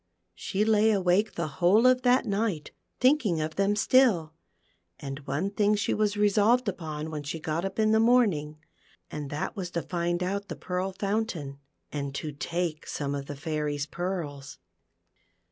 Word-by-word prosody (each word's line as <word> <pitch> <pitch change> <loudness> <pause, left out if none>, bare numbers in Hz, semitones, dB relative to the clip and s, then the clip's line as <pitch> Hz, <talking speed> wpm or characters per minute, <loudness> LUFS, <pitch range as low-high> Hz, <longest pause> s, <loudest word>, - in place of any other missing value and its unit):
She 195 - -1
lay 220 0 +4
awake 200 +1 +2
the 170 -1 -2
whole 180 - +3
of 255 0 +5
that 250 +1 +3
night, 200 -6 -1 0.3
thinking 250 - +3
of 155 +1 -3
them 200 +1 +2
still; 210 -9 +3 0.7
and 135 0 -6
one 155 +9 -1
thing 210 0 +2
she 205 - 0
was 210 -1 0
resolved 210 +4 +3
upon 160 -4 -4
when 150 -2 -4
she 150 +3 -5
got 160 +2 -2
up 195 +1 -4
in 215 -1 +3
the 220 - +4
morning, 210 -11 +3 0.5
and 150 -2 -5
that 145 +1 -3
was 185 -3 -4
to 170 -1 -3
find 175 0 -1
out 200 +2 -2
the - - -5
Pearl 185 +1 -3
Fountain, 190 -8 -3 0.3
and 140 -2 -4
to 150 +1 -4
take 165 +2 -3
some 140 -1 -3
of 140 -1 -4
the 145 - -6
Fairy's 145 -1 -2
pearls. 155 -5 -5
180 Hz, 165 wpm, -28 LUFS, 150-210 Hz, 0.7 s, of